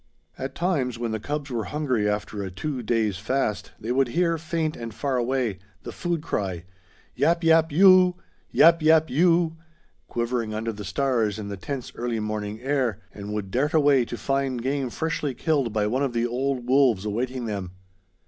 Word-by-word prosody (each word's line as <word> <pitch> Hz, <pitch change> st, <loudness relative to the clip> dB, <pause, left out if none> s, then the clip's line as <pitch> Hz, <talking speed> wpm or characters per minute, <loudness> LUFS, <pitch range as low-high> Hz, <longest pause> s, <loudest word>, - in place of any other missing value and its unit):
At 135 Hz, +1 st, -6 dB
times, 145 Hz, -9 st, 0 dB
when 115 Hz, -1 st, -3 dB
the 110 Hz, -, -2 dB
cubs 145 Hz, +4 st, -4 dB
were 115 Hz, -3 st, -2 dB
hungry 130 Hz, -9 st, 0 dB
after 105 Hz, 0 st, -3 dB
a 95 Hz, -, -4 dB
two 130 Hz, -, -4 dB
days 110 Hz, -4 st, 0 dB
fast, 110 Hz, 0 st, -1 dB
they 115 Hz, -, -4 dB
would 135 Hz, +1 st, +3 dB
hear, 165 Hz, +5 st, +1 dB
faint 160 Hz, -1 st, -2 dB
and 115 Hz, -1 st, -6 dB
far 130 Hz, +5 st, -2 dB
away, 120 Hz, -5 st, 0 dB, 0.2 s
the -, -, -6 dB
food 170 Hz, -3 st, -2 dB
cry, 95 Hz, -, -2 dB, 0.5 s
yap 170 Hz, +1 st, +1 dB
yap 165 Hz, 0 st, +5 dB
yooo! 185 Hz, +2 st, +6 dB, 0.3 s
yap 165 Hz, 0 st, +6 dB
yap 160 Hz, 0 st, +4 dB
yoooooo! 165 Hz, +2 st, +3 dB, 0.5 s
quivering 120 Hz, -2 st, -2 dB
under 110 Hz, +1 st, -2 dB
the 105 Hz, -1 st, -8 dB
stars 110 Hz, 0 st, 0 dB
in 105 Hz, -2 st, -6 dB
the 100 Hz, -, -4 dB
tense 130 Hz, +6 st, -5 dB
early 120 Hz, -1 st, -2 dB
morning 105 Hz, 0 st, -3 dB
air, 130 Hz, -6 st, 0 dB
and 105 Hz, 0 st, -7 dB
would 105 Hz, -2 st, -4 dB
dart 145 Hz, +7 st, 0 dB
away 145 Hz, -4 st, +5 dB
to 120 Hz, -, -6 dB
find 135 Hz, -3 st, -1 dB
game 135 Hz, -1 st, -1 dB
freshly 150 Hz, -1 st, -2 dB
killed 145 Hz, -7 st, 0 dB
by 105 Hz, -1 st, 0 dB
one 125 Hz, +6 st, 0 dB
of 135 Hz, -3 st, 0 dB
the 120 Hz, 0 st, +1 dB
old 125 Hz, +1 st, -2 dB
wolves 125 Hz, -7 st, +3 dB
awaiting 120 Hz, +4 st, -2 dB
them. 100 Hz, -4 st, -4 dB
125 Hz, 180 wpm, -25 LUFS, 110-150 Hz, 0.5 s, yooo